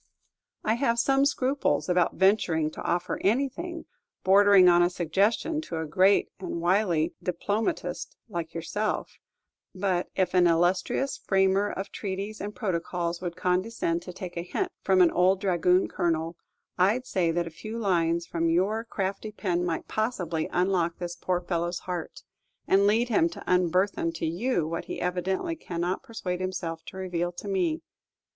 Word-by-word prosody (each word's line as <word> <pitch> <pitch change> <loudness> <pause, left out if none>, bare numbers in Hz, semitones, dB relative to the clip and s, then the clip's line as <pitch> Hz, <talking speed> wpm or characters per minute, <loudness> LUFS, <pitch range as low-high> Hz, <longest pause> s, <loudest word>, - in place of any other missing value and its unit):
I 220 - +2
have 235 -4 +2
some 270 +3 +3
scruples 255 - 0
about 180 -1 +2
venturing 175 -6 +2
to - - -8
offer 175 0 -1
anything 280 - -1 0.4
bordering 195 -1 +6
on 175 0 +6
a 175 - +4
suggestion 200 - 0
to 175 - -6
a 160 - -2
great 185 +6 +3
and 180 -2 -4
wily 175 -2 +2
diplomatist 205 - -2
like 170 -7 -5
yourself; 205 +6 -3 0.6
but 185 -2 0
if 185 -2 +1
an 180 -1 +5
illustrious 180 +10 +1
framer 195 +1 +2
of 195 +1 -5
treaties 200 +1 -5
and 205 +1 -5
protocols 175 -3 -2
would 175 -2 -4
condescend 180 -2 0
to 180 - -8
take 180 -1 -8
a 170 - -2
hint 365 - -2
from 190 -1 +4
an 170 - +4
old 185 +2 +3
dragoon 180 -1 +2
colonel, 165 0 -1 0.4
I 195 +6 +4
'd 255 - -9
say 185 -8 0
that 170 +1 0
a 165 - -7
few 215 +7 -7
lines 170 -5 +1
from 165 -1 -1
your 195 +7 +1
crafty 200 -1 -3
pen 180 -4 -1
might 170 -2 -2
possibly 180 -8 -2
unlock 180 -2 +1
this 175 -1 -5
poor 180 0 -1
fellow's 175 0 -2
heart, 175 -3 -5 0.4
and 200 +1 +4
lead 230 +4 +2
him 170 -7 +3
to 170 - -10
unburthen 180 -1 +1
to 165 - -3
you 175 +1 0
what 165 +1 -4
he - - -5
evidently 185 - -1
cannot 180 - -3
persuade 185 -5 -4
himself 175 -3 -4
to - - -9
reveal 175 -2 -2
to - - -8
me. 345 -5 0
185 Hz, 160 wpm, -27 LUFS, 170-205 Hz, 0.6 s, bordering